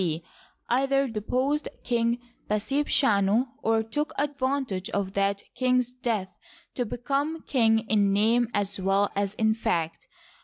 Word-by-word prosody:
C, 165 -2 -1 0.4
either 275 +2 +2
deposed 255 +7 -1
King 235 -1 +1 0.3
Pasebchanu 220 -1 +2
or 225 0 +2
took 295 +8 -2
advantage 270 -8 -1
of 200 -3 -2
that 200 0 0
king's 250 -1 +1
death 225 -7 -2 0.4
to 245 -3 -2
become 280 +8 -2
king 225 -4 +2
in 205 -2 +3
name 225 +4 +3
as 200 -2 0
well 195 +2 +2
as 200 0 -1
in 220 0 +2
fact. 170 -7 -2
225 Hz, 125 wpm, -27 LUFS, 200-260 Hz, 0.4 s, in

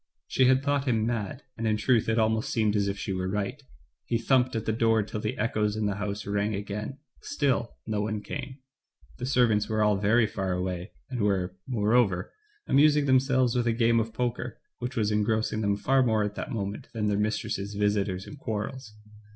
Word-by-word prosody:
She 130 - +3
had 130 +1 +4
thought 140 -1 +1
him 110 -3 +2
mad, 115 +2 -3
and 115 0 -2
in 110 -1 +2
truth 115 -1 +2
it 110 - +1
almost 110 0 +1
seemed 110 -2 +1
as 100 -1 +2
if 100 0 -2
she 100 - -3
were 95 0 -2
right. 105 +8 -2 0.4
He 115 - 0
thumped 125 +1 +2
at 115 - -2
the - - +1
door 115 -1 +2
till 105 +1 -5
the 110 +4 -3
echoes 105 -1 0
in 110 -1 -1
the 100 -1 -1
house 100 0 -3
rang, 100 +1 0
again, 105 +6 -5 0.2
still 130 -5 -1
no 105 -2 -1
one 105 0 -2
came; 135 -1 -6 0.6
the 125 - -3
servants 120 -6 +3
were 110 -1 +2
all 105 -1 +3
very 110 +4 +3
far 95 -3 -2
away, 90 +1 -3 0.2
and 125 -3 -2
were, 95 -3 0
moreover, 110 -5 +1 0.3
amusing 150 +1 +4
themselves 130 -2 +3
with 120 -1 +1
a 115 - +3
game 115 0 +3
of 115 0 -2
poker, 120 +1 -3 0.2
which 125 +2 -4
was 110 -3 +1
engrossing 110 +1 +1
them 100 -1 +1
far 135 +5 +3
more 110 -4 +2
at 105 0 -2
that - - -5
moment 100 -4 -4
than 110 -2 -1
their 105 0 +1
mistress's 105 -1 -2
visitors 100 -2 0
and 145 - -10
quarrels. 110 +1 -5
110 Hz, 200 wpm, -27 LUFS, 105-120 Hz, 0.6 s, had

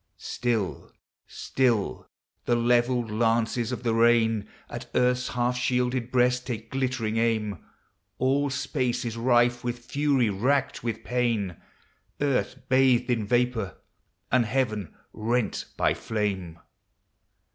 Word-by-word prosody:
Still, 115 -6 -2 0.4
still, 115 - -1 0.4
the 120 - +2
levelled 120 0 +2
lances 115 +1 +1
of 125 - -4
the 115 -2 +1
rain 115 -2 +3 0.2
At - - -8
earth's 125 0 +2
half 125 0 0
shielded 125 -1 0
breast 125 0 +2
take 115 -3 -5
glittering 130 -4 -1
aim; 110 -3 0 0.6
All 140 +2 +2
space 125 -2 -1
is 115 -1 -3
rife 120 0 +3
with 120 0 -2
fury, 140 -6 +1
racked 130 +8 0
with 115 -2 -3
pain, 115 -8 0 0.6
Earth 135 -2 -1
bathed 130 -2 +3
in 110 -4 0
vapor, 120 -4 0 0.5
and 120 -2 +3
heaven 110 - -1 0.2
rent 115 +2 -1
by - - +3
flame 95 -6 -3
120 Hz, 115 wpm, -26 LUFS, 110-125 Hz, 0.6 s, rain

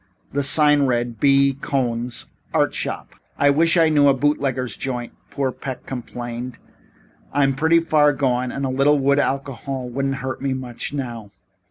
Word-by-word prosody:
The 140 - 0
sign 145 0 +4
read: 120 -2 -1
B. 140 +1 +4
COHN'S 120 -3 -2 0.3
ART - - +2
SHOP. - - -5 0.2
"I 145 0 +4
wish 165 +4 +3
I 165 -1 +5
knew 145 -2 +4
a 140 - +5
bootlegger's 135 -4 -1
joint," 120 -3 -4 0.2
poor 135 -2 -1
Peck 130 0 -7
complained. 120 -1 -6 0.7
"I'm 135 -1 +2
pretty 160 +5 +3
far 150 -3 +3
gone 125 -3 0
and 140 - -3
a - - -1
little 140 +3 +3
wood 140 +1 +2
alcohol 135 -2 -3
couldn't 135 +1 -1
hurt 130 0 -5
me 135 -1 -1
much 125 -2 -5
now. 120 -7 -5
135 Hz, 160 wpm, -21 LUFS, 125-145 Hz, 0.7 s, I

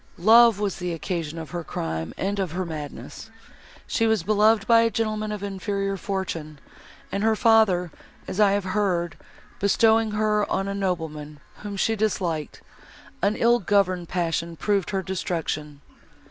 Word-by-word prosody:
Love 225 +3 +6
was 205 -2 -1
the 180 -1 -3
occasion 165 -2 -4
of 160 -2 -7
her 175 -1 -4
crime 80 - -4
and 200 +2 -2
of 185 -5 -2
her 185 +1 -2
madness. 155 +6 -8 0.6
She 225 - +1
was 220 -6 +1
beloved 210 +1 +3
by 230 0 +6
a 230 - +3
gentleman 215 -1 -2
of 210 -1 -5
inferior 195 0 -2
fortune, 185 -6 -4 0.5
and 200 - -2
her 220 0 +3
father, 210 -7 +3 0.4
as 190 - -5
I 205 -2 +5
have 200 0 0
heard, 185 -3 -1 0.4
bestowing 220 +2 +3
her 210 -1 +1
on 195 - 0
a 200 - -2
nobleman, 160 -6 -3 0.2
whom 205 -1 -7
she 225 +3 +1
disliked, 180 -7 -2 0.6
an 200 +2 +2
ill 235 +1 +3
governed 185 -3 +1
passion 170 -1 -2
proved 200 +4 0
her 195 -2 -2
destruction. 160 -5 -3
195 Hz, 155 wpm, -24 LUFS, 170-210 Hz, 0.6 s, Love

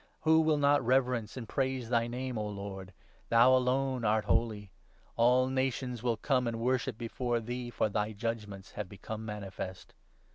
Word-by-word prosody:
Who 160 0 +5
will 155 -1 +3
not 145 -1 +3
reverence 125 -2 +1
and 120 -3 -6
4 - - -14
praise 130 -3 -1
thy 115 -1 +2
Name, 125 +1 -4
O 105 -1 -2
Lord? 100 -2 -6 0.4
Thou 120 +3 +6
alone 130 0 +1
art 110 0 +2
holy! 110 -4 0 0.4
All 125 +2 +4
nations 130 -2 -1
will 120 -2 0
come 125 -2 +1
and 115 -1 -2
worship 125 -1 0
before 120 +1 -2
thee, 120 +2 -5
for 120 - 0
thy 105 +1 -1
judgements 105 -3 -5
have 105 -3 -5
become 110 +2 -7
manifest.' 100 -3 -6
120 Hz, 170 wpm, -31 LUFS, 105-130 Hz, 0.4 s, Thou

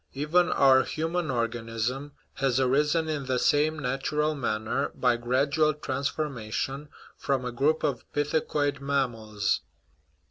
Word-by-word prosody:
Even 165 +6 +2
our 135 -1 +6
human 165 +1 -2
organism 120 +3 -2 0.2
has 135 -2 +1
arisen 150 +5 +2
in 150 -4 -3
the 130 -1 +1
same 150 +4 +2
natural 150 +3 -1
manner, 110 -6 -1
by 125 -2 +2
gradual 140 +6 +1
transformation, 135 -1 -3 0.3
from 135 -3 -1
a 125 - -2
group 145 +6 +1
of - - -1
pithecoid 145 -1 0
mammals. 115 -8 -1
135 Hz, 115 wpm, -27 LUFS, 125-150 Hz, 0.3 s, our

